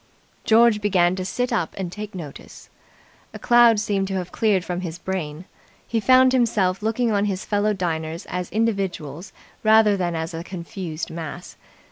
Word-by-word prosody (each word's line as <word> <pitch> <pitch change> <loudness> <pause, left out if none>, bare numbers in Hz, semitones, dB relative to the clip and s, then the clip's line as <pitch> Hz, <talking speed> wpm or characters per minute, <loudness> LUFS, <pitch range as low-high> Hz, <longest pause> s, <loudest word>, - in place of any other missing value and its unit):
George 225 -1 +5
began 185 -3 +2
to 185 - -4
sit 245 +6 -2
up 170 -6 -1
and 185 -3 -4
take 210 +1 -7
notice. 155 -6 -10 0.6
A - - -4
cloud 240 -3 +5
seemed 200 -2 -1
to 195 - -3
have 180 -1 -4
cleared 205 -5 +1
from 180 0 -3
his 170 -2 -5
brain. 175 -3 -5 0.4
He 230 - 0
found 255 +3 +5
himself 210 -7 +1
looking 225 +2 0
on 205 -1 +1
his 195 -2 -3
fellow 210 0 +1
diners 165 -2 -3
as 180 -1 -4
individuals 195 -7 -2 0.3
rather 215 -1 +5
than 175 -3 -2
as 160 +1 -4
a 165 +1 -5
confused 175 -2 -6
mass. 170 +2 -7
190 Hz, 165 wpm, -23 LUFS, 175-215 Hz, 0.6 s, George